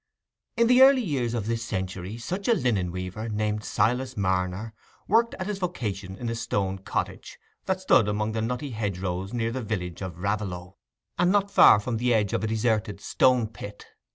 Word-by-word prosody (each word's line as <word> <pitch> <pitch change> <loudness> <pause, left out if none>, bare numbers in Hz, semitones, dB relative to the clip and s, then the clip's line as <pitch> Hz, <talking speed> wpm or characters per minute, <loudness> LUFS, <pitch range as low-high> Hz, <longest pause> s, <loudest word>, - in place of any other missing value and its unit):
In 235 - +5
the 250 +2 +5
early 265 -1 +7
years 130 - -1
of 110 -4 -2
this 115 +1 -2
century, 95 -1 -4
such 180 +12 -4
a 235 - +5
linen 105 - 0
weaver, 90 +5 -5
named 105 0 -1
Silas 125 +4 0
Marner, 95 +2 -1 0.3
worked 230 +3 +3
at 185 - -5
his 205 -1 -3
vocation 105 - -4
in 120 - -6
a 115 - -1
stone 100 -4 -2
cottage 95 - -4 0.3
that 190 0 -1
stood 130 - +4
among 105 +1 -1
the 110 0 -2
nutty 125 +5 -3
hedgerows 95 -3 -3
near 115 -1 -1
the 130 +2 -3
village 90 -6 -4
of 90 -3 -6
Raveloe, 95 -2 -3 0.4
and 175 +1 +4
not 200 0 +2
far 105 - +8
from 115 +2 -3
the 120 +1 +2
edge 105 -3 +1
of 95 - 0
a - - 0
deserted 110 -2 0
stone 125 +2 +3
pit. 105 -1 -10
110 Hz, 185 wpm, -26 LUFS, 95-125 Hz, 0.4 s, far